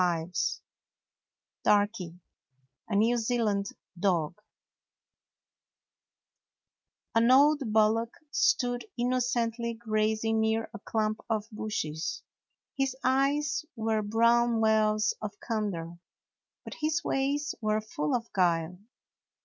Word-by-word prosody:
99 175 -1 0 1.3
DARKY: 205 -4 +1 0.7
A 210 - -1
NEW 230 +4 +3
ZEALAND 220 -4 0 0.3
DOG 175 -5 +1 2.8
N 230 +1 +4
old 290 +3 +6
bullock 220 +2 +2 0.2
stood 245 -9 +1
innocently 240 -1 0
grazing 220 0 0
near 220 +1 0
a - - -7
clump 215 0 -1
of 215 -1 -1
bushes. 190 -8 -3 0.5
His 270 -1 0
eyes 275 +3 +1
were 220 -1 0
brown 230 +2 +3
wells 215 -1 +3
of 205 -1 -6
candor, 180 -7 -3 0.6
but - - -8
his 310 +2 0
ways 280 +2 0
were 215 0 +1
full 150 -8 -2
of 230 -1 -4
guile. 175 -1 +1
220 Hz, 95 wpm, -29 LUFS, 205-240 Hz, 2.8 s, old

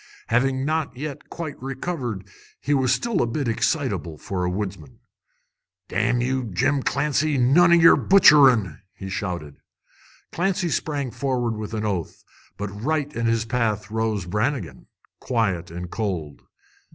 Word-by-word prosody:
Having 130 +3 +1
not 155 -4 -1
yet 145 0 -6
quite 160 -6 -6
recovered, 130 - -4 0.4
he 145 - -1
was 130 -3 +2
still 195 - +1
a 120 - +1
bit 130 +3 -2
excitable 85 -7 -1
for 90 +3 -4
a 90 - 0
woodsman. 100 +5 -5 0.9
"Damn 120 - +1
you, 130 +1 -1
Jim 115 +8 0
Clancy, 150 +2 0
none 145 +8 +5
o' - - +8
yer 165 -1 +7
butcherin'!" 135 - +5 0.2
he 95 - -7
shouted. 85 -6 -4 0.7
Clancy 175 0 0
sprang 145 -5 -2
forward 120 -2 -1
with 110 +1 -5
an 110 0 -2
oath, 95 -6 -3 0.3
but 100 0 -4
right 145 +8 -2
in 115 0 0
his 115 0 +1
path 110 -3 -1
rose 110 -4 -1
Brannigan, 105 - -2 0.3
quiet 95 -9 -1
and 85 +1 -7
cold. 90 -10 -4
120 Hz, 140 wpm, -23 LUFS, 100-140 Hz, 0.9 s, o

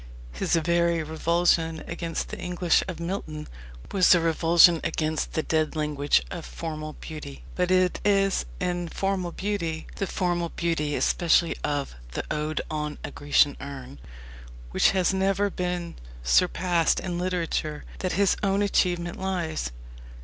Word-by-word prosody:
His - - 0
very 170 0 +2
revulsion 165 0 +1
against 165 -1 -4
the - - -6
English 175 -1 +2
of 180 -4 -5
Milton 170 -4 -4 0.4
was 185 -1 +6
a - - +3
revulsion 165 +1 +5
against 155 -1 -1
the 160 - 0
dead 155 0 0
language 150 - +1
of - - -5
formal 155 - -6
beauty. 150 -3 -9
But 180 -1 0
it 185 -1 +3
is 195 - +2
in 175 -1 -2
formal 190 -1 -1
beauty 170 -5 -3
the 195 - -1
formal 175 -2 -1
beauty 160 -4 -1
especially 170 -1 +2
of 145 -2 -2 0.2
the - - -2
Ode 155 +1 -1
on 150 -1 -3
a - - -5
Grecian 145 0 +3
Urn, 140 -1 -8 0.7
which - - +4
has 190 -1 +2
never 195 +1 +1
been 180 -2 -3 0.3
surpassed 175 - +3
in 175 -2 -3
literature 170 -4 -2
that 185 - -1
his 200 0 +3
own 200 0 +2
achievement 175 -3 0
lies. 175 - -2
170 Hz, 140 wpm, -26 LUFS, 155-180 Hz, 0.7 s, was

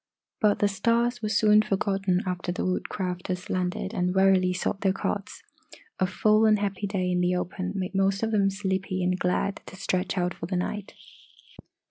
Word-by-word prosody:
But 210 -1 +3
the 205 - +3
stars 235 +4 +1
were 215 - -2
soon 215 0 +5
forgotten 195 -2 0
after 180 -1 -2
the 175 - -3
Woodcrafters 180 0 -3
landed 185 +2 -2
and 180 -2 0
wearily 190 -1 +4
sought 180 +2 -2
their 190 -2 +2
cots. 200 +1 -4 0.6
A 185 - +2
full 215 +3 +3
and 215 -1 +5
happy 200 0 -2
day 185 -2 -1
in 180 0 +1
the 180 0 +2
open 185 +1 -3
made 185 -1 -3
most 195 +1 +1
of 225 - 0
them 200 -2 +3
sleepy 190 -1 -2
and 180 +1 0
glad 180 +2 0
to - - -10
stretch 190 -1 -2
out 180 0 0
for 165 - -7
the 185 - -2
night. 195 +3 -3
190 Hz, 180 wpm, -26 LUFS, 180-205 Hz, 0.6 s, soon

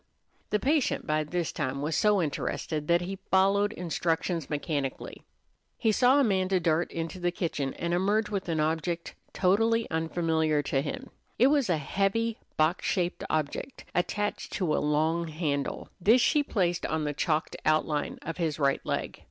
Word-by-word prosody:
The 210 - +2
patient 280 +6 +1
by 155 0 +1
this 170 +2 -2
time 135 -1 -2
was 155 +1 -1
so 205 -4 +3
interested 150 0 -3
that 170 0 +3
he 190 +2 -5
followed 195 +2 +3
instructions 170 -2 -1
mechanically. 145 -2 -3 0.6
He 220 - +2
saw 255 +5 +4
Amanda 190 -6 +2
dart 165 0 +1
into 165 +3 -4
the 175 0 +1
kitchen 160 -6 -2
and 170 0 -2
emerge 205 +4 +2
with 200 -4 -3
an 160 -2 0
object 165 +2 -1 0.2
totally 225 +5 +2
unfamiliar 160 -2 +1
to 135 -1 0
him. 265 - -6 0.3
It 250 - +6
was 280 -8 +2
a 170 - +3
heavy, 200 +9 0 0.2
box 155 +3 +2
shaped 180 -2 -1
object, 155 - -3
attached 205 +4 -1
to 175 -6 0
a - - 0
long 160 +3 +1
handle. 150 -3 -2
This 220 +8 +5
she 295 +4 +3
placed 180 -10 0
on 160 0 -1
the 150 0 -1
chalked 155 +2 -1
outline 155 -1 +1
of 165 - -5
his 160 -4 -1
right 140 -2 +1
leg. - - -3
170 Hz, 160 wpm, -28 LUFS, 155-195 Hz, 0.6 s, It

